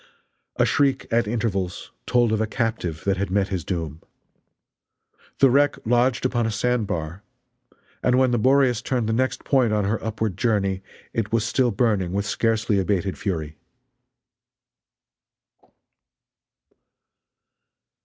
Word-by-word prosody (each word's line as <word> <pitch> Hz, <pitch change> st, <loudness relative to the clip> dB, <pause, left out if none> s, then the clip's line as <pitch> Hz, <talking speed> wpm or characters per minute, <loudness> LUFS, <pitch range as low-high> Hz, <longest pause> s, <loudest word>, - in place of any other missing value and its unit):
A -, -, +3 dB
shriek 140 Hz, -2 st, +1 dB
at 115 Hz, -1 st, +2 dB
intervals 105 Hz, -5 st, -2 dB, 0.2 s
told 120 Hz, -2 st, +3 dB
of 110 Hz, -1 st, +1 dB
a 110 Hz, -, 0 dB
captive 110 Hz, -9 st, -2 dB
that 100 Hz, -1 st, +1 dB
had 100 Hz, 0 st, -2 dB
met 100 Hz, 0 st, +1 dB
his 95 Hz, -4 st, -3 dB
doom. 80 Hz, -4 st, -4 dB, 1.4 s
The 135 Hz, -2 st, +5 dB
wreck 145 Hz, +2 st, +3 dB
lodged 120 Hz, +2 st, +2 dB
upon 120 Hz, -3 st, +1 dB
a -, -, -1 dB
sandbar, 100 Hz, -7 st, -2 dB, 0.8 s
and 125 Hz, 0 st, +2 dB
when 130 Hz, -1 st, +3 dB
the 120 Hz, -, +1 dB
Boreas 130 Hz, -1 st, +3 dB
turned 125 Hz, -4 st, -1 dB
the 110 Hz, -, 0 dB
next 130 Hz, +3 st, -1 dB
point 130 Hz, -5 st, +2 dB
on 105 Hz, -2 st, +1 dB
her 105 Hz, +2 st, -1 dB
upward 110 Hz, -3 st, -2 dB
journey 100 Hz, -4 st, 0 dB, 0.3 s
it 110 Hz, -3 st, -2 dB
was 115 Hz, -1 st, +1 dB
still 125 Hz, +2 st, +2 dB
burning 100 Hz, -5 st, 0 dB
with 100 Hz, +1 st, -1 dB
scarcely 110 Hz, -1 st, +1 dB
abated 95 Hz, 0 st, -1 dB
fury. 80 Hz, -6 st, -4 dB
110 Hz, 130 wpm, -23 LUFS, 95-120 Hz, 1.4 s, The